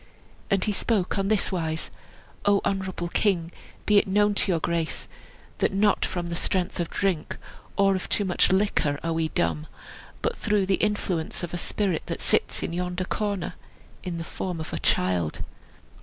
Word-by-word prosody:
And 195 Hz, -1 st, +2 dB
he 215 Hz, -, +1 dB
spoke 205 Hz, -2 st, +1 dB
on 195 Hz, -, 0 dB
this 215 Hz, 0 st, +2 dB
wise: 160 Hz, -3 st, -2 dB, 0.5 s
"O 205 Hz, -1 st, +5 dB
honorable 190 Hz, -3 st, -1 dB
king, 175 Hz, -4 st, +1 dB, 0.3 s
be 210 Hz, -1 st, +6 dB
it -, -, -1 dB
known 205 Hz, +2 st, +3 dB
to 200 Hz, -, +2 dB
your 170 Hz, -, +2 dB
grace 165 Hz, 0 st, -1 dB, 0.5 s
that -, -, +2 dB
not 205 Hz, +1 st, +3 dB
from 175 Hz, -2 st, -3 dB
the 170 Hz, -, -2 dB
strength 185 Hz, +1 st, 0 dB
of 170 Hz, -, -1 dB
drink, 185 Hz, -6 st, -1 dB, 0.4 s
or 195 Hz, -1 st, +5 dB
of 185 Hz, -, -4 dB
too 205 Hz, -, +2 dB
much 180 Hz, -1 st, +3 dB
liquor, 190 Hz, -7 st, +2 dB
are 165 Hz, 0 st, 0 dB
we 160 Hz, 0 st, +1 dB
dumb, 155 Hz, 0 st, -1 dB, 0.6 s
but 470 Hz, +1 st, 0 dB
through 210 Hz, -3 st, +1 dB
the 190 Hz, 0 st, +2 dB
influence 190 Hz, -6 st, -1 dB
of 175 Hz, -, -4 dB
a -, -, -1 dB
spirit 190 Hz, -2 st, 0 dB
that -, -, -3 dB
sits -, -, +1 dB
in -, -, -2 dB
the 180 Hz, +1 st, -2 dB
corner 200 Hz, -2 st, -1 dB
yonder, -, -, -20 dB, 0.5 s
in 175 Hz, -2 st, -4 dB
the 165 Hz, -, -3 dB
form 175 Hz, +1 st, -4 dB
of 160 Hz, -, -5 dB
a -, -, -2 dB
child." 90 Hz, -4 st, +1 dB
185 Hz, 185 wpm, -26 LUFS, 165-200 Hz, 0.6 s, be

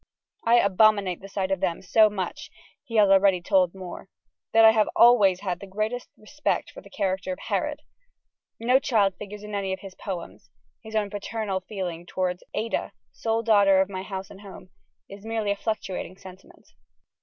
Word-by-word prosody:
"I 230 Hz, +1 st, +4 dB
abominate 200 Hz, -3 st, +3 dB
the 195 Hz, -, -10 dB
sight 195 Hz, -1 st, -2 dB
of 190 Hz, -, 0 dB
them 180 Hz, -1 st, -2 dB
so 215 Hz, +3 st, +5 dB
much," 190 Hz, -3 st, -5 dB, 0.3 s
he 230 Hz, -, -8 dB
has 210 Hz, -2 st, +6 dB
already 195 Hz, -1 st, +5 dB
told 180 Hz, 0 st, +2 dB
Moore, 185 Hz, 0 st, -9 dB, 0.4 s
"that 225 Hz, 0 st, +6 dB
I 220 Hz, -, +9 dB
have 215 Hz, -1 st, +2 dB
always 205 Hz, -6 st, +5 dB
had 180 Hz, -3 st, -3 dB
the 200 Hz, -, -10 dB
greatest 215 Hz, +5 st, -3 dB
respect 290 Hz, +8 st, -3 dB
for -, -, -11 dB
the -, -, -16 dB
character 195 Hz, +4 st, -2 dB
of 275 Hz, -, -4 dB
Herod!" -, -, -3 dB, 0.8 s
No 250 Hz, +3 st, +3 dB
child 210 Hz, -8 st, +2 dB
figures 210 Hz, 0 st, -8 dB
in 210 Hz, 0 st, -8 dB
any 195 Hz, -2 st, -2 dB
of 190 Hz, -, -6 dB
his 195 Hz, -2 st, -10 dB
poems: 185 Hz, -4 st, -7 dB, 0.3 s
his 220 Hz, -1 st, -9 dB
own 205 Hz, -2 st, 0 dB
paternal 205 Hz, -1 st, -3 dB
feeling 180 Hz, -3 st, -6 dB
towards 180 Hz, -1 st, -2 dB
"Ada, 225 Hz, +2 st, -2 dB, 0.2 s
sole 225 Hz, 0 st, -1 dB
daughter 200 Hz, -4 st, +5 dB
of 190 Hz, 0 st, +2 dB
my 185 Hz, -1 st, -4 dB
house 190 Hz, -1 st, -7 dB
and 195 Hz, -, -13 dB
home," 190 Hz, -2 st, -12 dB, 0.4 s
is 200 Hz, 0 st, -12 dB
merely 220 Hz, -2 st, -1 dB
a -, -, 0 dB
fluctuating 200 Hz, -3 st, -4 dB
sentiment. 190 Hz, -1 st, -15 dB
200 Hz, 180 wpm, -25 LUFS, 190-220 Hz, 0.8 s, I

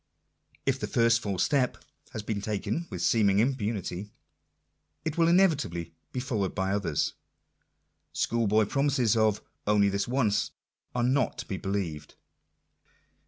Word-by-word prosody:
If 135 Hz, -1 st, +1 dB
the -, -, -2 dB
first 115 Hz, -1 st, +3 dB
false 100 Hz, -5 st, 0 dB
step 130 Hz, -4 st, +1 dB, 0.3 s
has 110 Hz, -, -6 dB
been 105 Hz, -1 st, -2 dB
taken 110 Hz, -, -2 dB
with -, -, -4 dB
seeming 100 Hz, -4 st, +3 dB
impunity, 105 Hz, -5 st, -1 dB, 1.0 s
it 160 Hz, -, -1 dB
will 165 Hz, -1 st, +3 dB
inevitably 150 Hz, -, +2 dB, 0.2 s
be 125 Hz, -, -3 dB
followed 110 Hz, -7 st, -2 dB
by 95 Hz, -1 st, 0 dB
others. 90 Hz, -8 st, 0 dB, 1.0 s
School 115 Hz, -1 st, 0 dB
boy 105 Hz, +1 st, +4 dB
promises 135 Hz, -2 st, +2 dB
of—" 110 Hz, -2 st, +2 dB, 0.2 s
only 105 Hz, -1 st, +4 dB
this 100 Hz, +2 st, -1 dB
once" 120 Hz, -5 st, +1 dB, 0.5 s
are 120 Hz, -, +1 dB
not 130 Hz, 0 st, +1 dB
to -, -, -6 dB
be 95 Hz, -, -3 dB
believed. 90 Hz, -8 st, -3 dB
110 Hz, 135 wpm, -28 LUFS, 100-130 Hz, 1.0 s, boy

